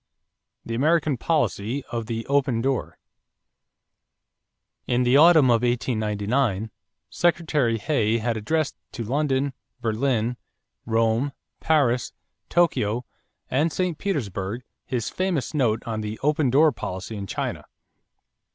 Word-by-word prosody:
=The 115 - -4
American 150 +3 +2
Policy 130 -3 -1
of 115 -2 -3
the 115 0 -3
"Open 135 -4 +1
Door."= 135 +1 -1 1.9
In 125 0 +2
the 125 +2 +3
autumn 155 -3 +7
of 115 -1 +3
1899, 110 -2 0 0.4
Secretary 155 -9 +1
Hay 115 -2 +1
had 115 0 -1
addressed 155 +8 -1 0.2
to 120 - -4
London, 135 +2 0 0.3
Berlin, 120 0 0 0.5
Rome, 115 +4 +1 0.3
Paris, 135 -6 +2 0.4
Tokyo, 125 -9 +1 0.5
and 150 +6 +2
St. 180 0 -1
Petersburg 115 - -3 0.2
his 120 -4 -2
famous 180 -9 -1
note 120 -7 +1
on 110 -2 -3
the 105 +1 -4
"open 150 -1 +2
door" 150 +5 +5
policy 95 -2 -6
in 100 -1 -5
China. - - -4
125 Hz, 115 wpm, -24 LUFS, 110-145 Hz, 1.9 s, autumn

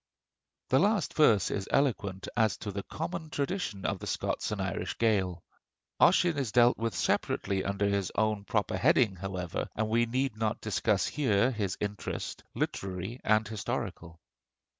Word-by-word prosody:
The 130 - +4
last 205 -2 +2
verse 115 - +4
is 100 -1 -2
eloquent 105 -9 0
as 110 -3 +2
to 105 - -5
the 100 +1 -3
common 160 - -5
traditions 140 - -3
of - - -1
the - - -7
Scots - - -2
and 105 - -3
Irish 95 0 -3
Gael. 95 -6 +1 0.6
Ossian 175 -4 +4
is 130 -6 -2
dealt 120 +1 +5
with 115 -4 -1
separately 95 +2 0
under 100 +1 -1
his 100 -3 0
own 110 -2 +1
proper - - -1
heading, 100 -4 +3
however, 90 -1 -4
and 110 0 -1
we 120 +1 +2
need 130 0 -1
not 110 -1 -1
discuss 105 -1 +1
here 125 -4 +2
his 100 -6 -2
interest, 105 0 -4
literary 95 +5 -3
and 110 -1 +3
historical. 100 -7 -4
110 Hz, 155 wpm, -30 LUFS, 95-125 Hz, 0.6 s, dealt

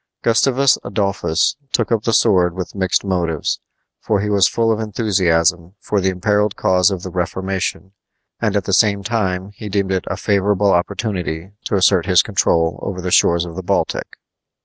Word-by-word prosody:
Gustavus 130 +3 +3
Adolphus 100 -5 0
took 115 -2 0
up 110 -2 0
the 115 - +1
sword 90 -7 +3
with 95 -1 -5
mixed 95 -2 0
motives, 85 -5 -1 0.4
for 105 -2 0
he 105 +1 -2
was 100 -2 +4
full 115 -1 0
of 110 - -1
enthusiasm 90 -5 0
for 105 -2 -1
the 95 - +1
imperiled 105 +2 0
cause 90 +1 +3
of 95 -3 -5
the 95 - -6
Reformation, 95 +1 -3 0.5
and 105 -3 0
at 100 - +1
the 95 - -3
same 100 0 +3
time 95 -4 -2
he 105 +1 -8
deemed 100 -1 -1
it 95 -1 -1
a - - -3
favorable 100 0 +1
opportunity 90 -2 -2
to - - -1
assert 95 -2 +3
his 90 -2 +5
control 85 -5 0
over 95 -2 -5
the 90 0 -4
shores 85 0 +3
of 85 -1 -9
the 95 - -4
Baltic. 90 - -2
95 Hz, 175 wpm, -18 LUFS, 90-105 Hz, 0.5 s, his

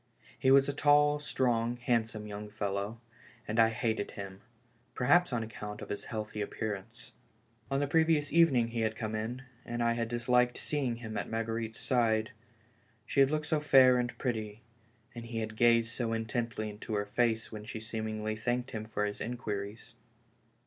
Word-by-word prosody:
He 130 - +3
was 135 0 +6
a 140 - -1
tall, 145 +1 +4
strong, 120 -4 0
handsome 115 -3 0
young 105 0 -7
fellow, 100 +1 -3 0.5
and 110 +2 -1
I 115 0 +7
hated 110 -2 -1
him, 95 -1 -8 0.5
perhaps 160 +7 +4
on 120 -2 0
ac 110 0 -9
count 105 0 -6
of - - -9
his 100 - -4
healthy 110 -2 -4
appearance. 105 -1 -5 0.6
On 135 - +1
the 145 - +1
previous 160 -1 +2
even 165 -4 +6
ing 120 -2 +3
he 115 0 -3
had 110 0 0
come 110 -1 -4
in, 115 +4 -3 0.2
and 120 0 -2
I 115 0 +3
had 115 -1 -1
disliked 125 +1 +2
seeing 135 -6 -1
him 115 -2 -6
at - - -3
Marguerite's 115 0 -3
side; 110 -3 +1 0.7
she - - -1
had 135 -1 +6
looked 155 0 -1
so 155 -1 +1
fair 130 -4 +6
and 120 0 -2
pretty, 110 -4 -3 0.5
and 120 - -7
he 115 -1 -5
had 110 -1 -3
gazed 115 0 +4
so 115 -2 -2
intently 115 -1 -2
into 105 +2 -7
lier 105 -1 0
face 115 +1 0
when 105 -1 -7
she 110 - -6
smi 110 0 -4
lingly 110 0 -2
thanked 120 +3 -2
him 110 -1 -4
for 105 -1 -1
his 105 0 -4
inquiries. 105 -3 -5
115 Hz, 185 wpm, -31 LUFS, 110-125 Hz, 0.7 s, I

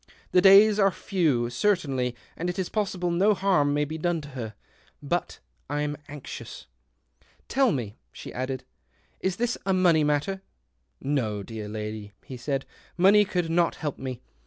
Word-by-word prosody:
The 180 - +5
days 200 +2 +7
are 195 -1 +5
few, 155 -12 0
certainly, 135 -7 0 0.2
and 175 +2 -3
it 180 - -4
is 190 -2 -2
possible 190 -5 -1
no 200 +5 +3
harm 185 -8 +2
may 145 +1 +1
be 160 +2 -6
done 175 0 0
to 145 - -10
her. 115 -6 -6 0.4
But 170 +5 -2 0.3
I'm 145 0 -1
anxious." 145 -2 -8 0.4
" - - -35
Tell 265 -3 +4
me," 115 - -3
she - - -9
added, 130 0 -3 0.3
" - - -38
is 190 -1 -1
this 240 +3 -1
a 190 - +1
money 175 -4 +4
matter? 150 +6 0 0.4
" 60 -1 -47 0.2
"No, 105 -4 -3
dear 110 0 -7
lady," 105 -1 -6
he 130 - -7
said. 135 +2 -2 0.2
" - - -29
Money 200 +3 +6
could 180 -4 -1
not 170 0 +2
help 150 -3 -4
me. 130 -2 -5
150 Hz, 175 wpm, -26 LUFS, 125-190 Hz, 0.4 s, days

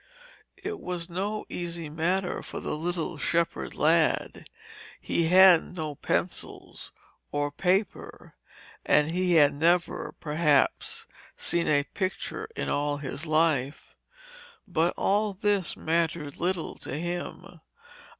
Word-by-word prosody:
It 400 +1 -5
was 175 -1 -5
no 205 +4 -2
easy 170 -2 -5
matter 175 +5 -1
for - - -7
the - - -3
little 170 0 -3
shepherd 170 +1 -1
lad. 160 +1 +2 0.5
He 165 - 0
had 180 -1 +6
no 155 -3 -3
pencils - - -4 0.4
or 145 0 -1
paper, 185 +5 -1 0.5
and 150 +2 +3
he 180 0 +1
had 145 -3 +6
never, 170 +4 +1
perhaps, 150 -2 +1 0.3
seen 170 -1 0
a 145 -1 +3
picture 185 - -4
in - - -3
all 145 0 0
his 145 +2 -5
life. 155 -3 +1 0.7
But 175 -2 +1
all 205 +1 +1
this 200 -2 0
mattered 160 -3 -1
little 180 -1 -1
to 140 - -6
him. 175 +2 -5
170 Hz, 115 wpm, -27 LUFS, 150-180 Hz, 0.7 s, had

